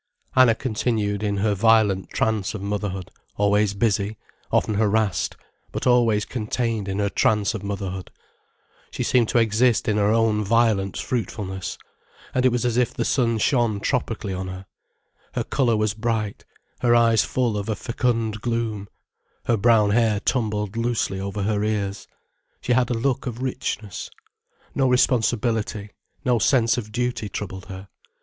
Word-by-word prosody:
Anna 130 Hz, -3 st, +6 dB
continued 110 Hz, -4 st, -1 dB
in 100 Hz, -1 st, -1 dB
her 105 Hz, +1 st, +1 dB
violent 105 Hz, -2 st, +3 dB
trance 110 Hz, -3 st, -1 dB
of -, -, -5 dB
motherhood, 100 Hz, -2 st, -3 dB, 0.3 s
always 105 Hz, 0 st, +2 dB
busy, 100 Hz, 0 st, 0 dB, 0.3 s
often 110 Hz, -, +2 dB
harassed, 105 Hz, -2 st, +1 dB, 0.3 s
but -, -, -4 dB
always 115 Hz, -4 st, +3 dB
contained 115 Hz, -3 st, -2 dB
in 95 Hz, 0 st, -2 dB
her 100 Hz, 0 st, +1 dB
trance 105 Hz, +1 st, +1 dB
of 110 Hz, -, -5 dB
motherhood. 100 Hz, -2 st, -4 dB, 0.8 s
She -, -, -3 dB
seemed 120 Hz, -3 st, +2 dB
to -, -, +1 dB
exist 115 Hz, +2 st, +3 dB
in 105 Hz, -2 st, +2 dB
her 105 Hz, 0 st, +3 dB
own 110 Hz, -1 st, +2 dB
violent 105 Hz, -3 st, +2 dB
fruitfulness, 105 Hz, -6 st, -3 dB, 0.6 s
and 130 Hz, -1 st, +3 dB
it -, -, +2 dB
was 125 Hz, 0 st, 0 dB
as 120 Hz, -1 st, 0 dB
if 125 Hz, -2 st, +2 dB
the -, -, -1 dB
sun 115 Hz, -4 st, +1 dB
shone 115 Hz, -2 st, +1 dB
tropically 110 Hz, -4 st, -2 dB
on 95 Hz, 0 st, -4 dB
her. 95 Hz, +1 st, -7 dB, 0.7 s
Her -, -, 0 dB
colour 120 Hz, -5 st, +1 dB
was 105 Hz, -1 st, +1 dB
bright, 110 Hz, -2 st, -2 dB, 0.3 s
her 120 Hz, -1 st, +3 dB
eyes 115 Hz, -2 st, +4 dB
full 120 Hz, -4 st, 0 dB
of 100 Hz, +1 st, -3 dB
a 110 Hz, -, 0 dB
fecund 115 Hz, -1 st, -1 dB
gloom, 115 Hz, -3 st, -2 dB, 0.6 s
her 120 Hz, -, +3 dB
brown 110 Hz, -1 st, +4 dB
hair 110 Hz, -2 st, +2 dB
tumbled 105 Hz, -3 st, -1 dB
loosely 115 Hz, -4 st, -1 dB
over 100 Hz, +1 st, -3 dB
her 105 Hz, 0 st, 0 dB
ears. 100 Hz, -2 st, -2 dB, 0.5 s
She 125 Hz, -, 0 dB
had 125 Hz, 0 st, +2 dB
a 120 Hz, -, 0 dB
look 130 Hz, +3 st, -1 dB
of 125 Hz, +1 st, -5 dB
richness. 120 Hz, -6 st, -4 dB, 0.6 s
No 135 Hz, -1 st, +2 dB
responsibility, 115 Hz, -4 st, +1 dB, 0.3 s
no 125 Hz, -2 st, +3 dB
sense 115 Hz, +2 st, +3 dB
of 105 Hz, -2 st, -8 dB
duty 120 Hz, -2 st, -2 dB
troubled 95 Hz, -2 st, -6 dB
her. 95 Hz, 0 st, -8 dB
110 Hz, 155 wpm, -23 LUFS, 100-120 Hz, 0.8 s, Anna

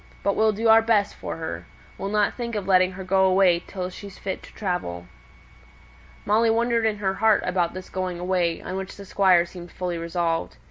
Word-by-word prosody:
But 200 Hz, -, +1 dB
we'll 220 Hz, 0 st, +3 dB
do 220 Hz, +2 st, -1 dB
our 225 Hz, 0 st, +7 dB
best 220 Hz, -3 st, +2 dB
for -, -, -6 dB
her. 160 Hz, -1 st, -6 dB, 0.3 s
We'll 195 Hz, -, -4 dB
not 210 Hz, 0 st, +1 dB
think 235 Hz, -2 st, -5 dB
of 200 Hz, -3 st, -3 dB
letting 185 Hz, -1 st, +4 dB
her 190 Hz, +1 st, -7 dB
go 190 Hz, +1 st, +3 dB
away 185 Hz, -2 st, +4 dB
till 185 Hz, -1 st, -5 dB
she's 200 Hz, +1 st, -10 dB
fit 190 Hz, -2 st, -5 dB
to -, -, -14 dB
travel." 175 Hz, -, -3 dB, 1.2 s
Molly 225 Hz, +3 st, +3 dB
wondered 230 Hz, 0 st, +2 dB
in 215 Hz, -1 st, -1 dB
her 195 Hz, -2 st, -1 dB
heart 215 Hz, +1 st, +3 dB
about 180 Hz, -1 st, 0 dB
this 185 Hz, 0 st, -7 dB
going 185 Hz, -2 st, -3 dB
away, 175 Hz, -2 st, 0 dB
on 185 Hz, -, -4 dB
which 190 Hz, 0 st, -6 dB
the 200 Hz, -, -10 dB
Squire 185 Hz, -3 st, +4 dB
seemed 175 Hz, 0 st, -11 dB
fully 175 Hz, -2 st, -4 dB
resolved. 165 Hz, -1 st, -2 dB
190 Hz, 200 wpm, -24 LUFS, 180-210 Hz, 1.2 s, our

